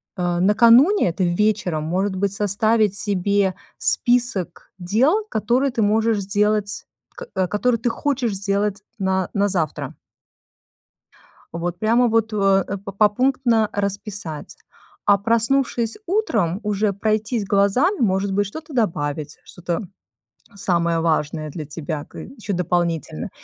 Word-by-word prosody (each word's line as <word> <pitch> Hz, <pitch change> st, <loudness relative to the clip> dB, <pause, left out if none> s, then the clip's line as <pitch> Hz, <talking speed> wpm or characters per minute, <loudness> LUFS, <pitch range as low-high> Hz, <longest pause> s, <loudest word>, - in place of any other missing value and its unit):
Э, 175 Hz, -1 st, -1 dB
накануне, 235 Hz, -, +5 dB
это 185 Hz, +3 st, -2 dB
вечером, 180 Hz, -3 st, 0 dB
может 190 Hz, +5 st, -1 dB
быть, 195 Hz, +1 st, -1 dB
составить 210 Hz, +1 st, +1 dB
себе 200 Hz, -2 st, 0 dB, 0.2 s
список 240 Hz, -8 st, 0 dB
дел, 260 Hz, -, +2 dB
которые 245 Hz, +6 st, +1 dB
ты 230 Hz, -, -1 dB
можешь 220 Hz, +1 st, +2 dB
сделать, 205 Hz, +1 st, 0 dB, 0.5 s
э, 185 Hz, -1 st, +1 dB
которые 230 Hz, +3 st, 0 dB
ты 240 Hz, -, 0 dB
хочешь 255 Hz, -2 st, -1 dB
сделать 200 Hz, +1 st, -1 dB, 0.2 s
на 190 Hz, -1 st, 0 dB
на 200 Hz, 0 st, +2 dB
завтра. 170 Hz, -6 st, -2 dB, 1.6 s
Вот 175 Hz, +1 st, -4 dB
прямо 235 Hz, +3 st, +3 dB
вот, 225 Hz, -1 st, +1 dB
э, 195 Hz, -2 st, +3 dB, 0.3 s
попунктно 230 Hz, +1 st, +2 dB
расписать. 200 Hz, -5 st, -5 dB, 0.5 s
А 200 Hz, -, +5 dB
проснувшись 230 Hz, +2 st, 0 dB
утром, 225 Hz, -, 0 dB
уже 210 Hz, 0 st, 0 dB
пройтись 215 Hz, +2 st, -1 dB
глазами, 205 Hz, -, +2 dB
может 195 Hz, -2 st, +1 dB
быть, 205 Hz, +1 st, +1 dB
что-то 310 Hz, -, -9 dB
добавить, 155 Hz, -, -2 dB
что-то 175 Hz, -1 st, -4 dB, 0.8 s
самое 170 Hz, -4 st, 0 dB
важное 155 Hz, -1 st, -1 dB
для 155 Hz, -1 st, -6 dB
тебя 145 Hz, 0 st, -5 dB
к -, -, -15 dB
ещё 210 Hz, -7 st, -6 dB
дополнительно. 170 Hz, -, -1 dB
205 Hz, 120 wpm, -21 LUFS, 180-225 Hz, 1.6 s, накануне